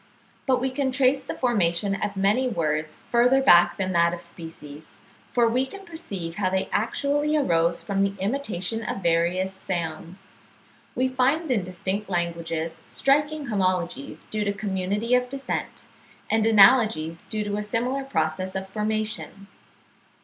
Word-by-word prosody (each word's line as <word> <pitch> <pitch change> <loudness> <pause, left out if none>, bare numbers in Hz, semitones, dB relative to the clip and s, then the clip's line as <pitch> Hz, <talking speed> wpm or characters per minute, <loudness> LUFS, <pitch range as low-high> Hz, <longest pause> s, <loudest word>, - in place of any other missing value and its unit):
But 260 -1 +3
we 260 +1 -1
can 265 0 -1
trace 270 +1 +2
the - - -6
formation 200 -6 +1
of 200 0 -3
many 205 +7 +2
words 155 -7 -2
further 245 +3 +4
back 175 -8 +6
than 190 -1 -1
that 170 -1 +3
of 170 - -10
species, 160 -2 -11 0.3
for 240 -1 +3
we 245 +3 +2
can 390 +9 -9
perceive 200 - -6
how 190 -3 +1
they 190 0 -1
actually 290 +6 +1
arose 170 - +1
from 195 -1 -1
the 200 0 -2
imitation 220 -2 -2
of 195 -3 -4
various 175 +3 +1
sounds. 175 0 -5 0.7
We 255 +1 +2
find 265 +4 +1
in 215 -7 +1
distinct 190 +3 -4
languages 170 -2 -2
striking 295 +2 +1
homologies 185 -7 -1
due 215 -1 -2
to 200 -1 0
community 200 +3 -2
of 250 0 +3
descent, 275 +1 -4 0.5
and 220 0 +3
analogies 210 -7 +5
due 215 -1 -3
to 205 0 -3
a - - -1
similar 245 +6 -1
process 185 -5 -2
of 190 0 -3
formation. 215 -1 -3
200 Hz, 150 wpm, -25 LUFS, 175-250 Hz, 0.7 s, back